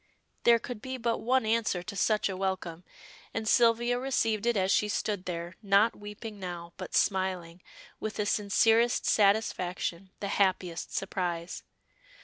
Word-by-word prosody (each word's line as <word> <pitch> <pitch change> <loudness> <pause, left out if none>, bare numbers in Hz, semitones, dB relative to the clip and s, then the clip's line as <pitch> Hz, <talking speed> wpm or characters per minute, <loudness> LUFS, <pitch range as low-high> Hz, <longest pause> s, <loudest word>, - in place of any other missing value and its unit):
There 235 0 +7
could 235 -1 -7
be 260 0 -5
but 235 -1 -1
one 255 0 +1
answer 220 -5 0
to 200 - -7
such 215 +1 +2
a 195 - -4
welcome, 185 -3 -3 0.5
and 225 -1 -2
Sylvia 240 +1 +3
received 230 -4 0
it 240 -2 +2
as 190 0 +1
she 210 - +3
stood 200 -2 -2
there, 170 0 -5
not 200 +2 +3
weeping 210 +1 -9
now, 175 -2 -6
but 185 - -6
smiling 185 -3 0 0.4
with 215 - -4
the 210 - -1
sincerest 225 +3 +3
satisfaction, 195 -3 +1
the 200 - -3
happiest 185 -4 0
surprise. 175 -3 -3
200 Hz, 145 wpm, -29 LUFS, 185-225 Hz, 0.5 s, There